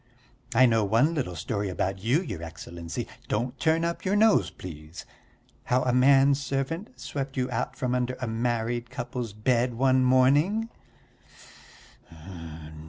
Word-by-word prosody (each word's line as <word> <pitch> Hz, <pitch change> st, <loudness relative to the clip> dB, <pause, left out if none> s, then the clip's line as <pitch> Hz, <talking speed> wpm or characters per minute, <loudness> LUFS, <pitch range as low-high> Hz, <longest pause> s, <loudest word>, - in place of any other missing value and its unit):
I 130 Hz, +3 st, +7 dB
know 115 Hz, -3 st, +3 dB
one 115 Hz, +10 st, +3 dB
little 130 Hz, -, -2 dB
story 100 Hz, +5 st, -2 dB
about 95 Hz, +1 st, -2 dB
you, 135 Hz, +11 st, +2 dB
your 85 Hz, -, -6 dB
Excellency 85 Hz, 0 st, -6 dB, 0.2 s
don't 120 Hz, +4 st, -1 dB
turn 165 Hz, 0 st, +2 dB
up 170 Hz, 0 st, -3 dB
your 190 Hz, +2 st, +1 dB
nose, 220 Hz, +1 st, +4 dB
please 75 Hz, -2 st, -10 dB, 0.6 s
how 125 Hz, +1 st, +2 dB
a 125 Hz, -, +1 dB
man 135 Hz, +2 st, +5 dB
servant 140 Hz, -, -3 dB
swept 135 Hz, -1 st, -5 dB
you 125 Hz, 0 st, -1 dB
out -, -, -2 dB
from 125 Hz, -3 st, -2 dB
under 125 Hz, 0 st, -1 dB
a 125 Hz, -, -3 dB
married 120 Hz, +1 st, -1 dB
couple's 125 Hz, -3 st, -5 dB
bed 120 Hz, +3 st, 0 dB
one 130 Hz, +1 st, +3 dB
morning." 145 Hz, -, +3 dB
125 Hz, 140 wpm, -27 LUFS, 115-140 Hz, 0.6 s, I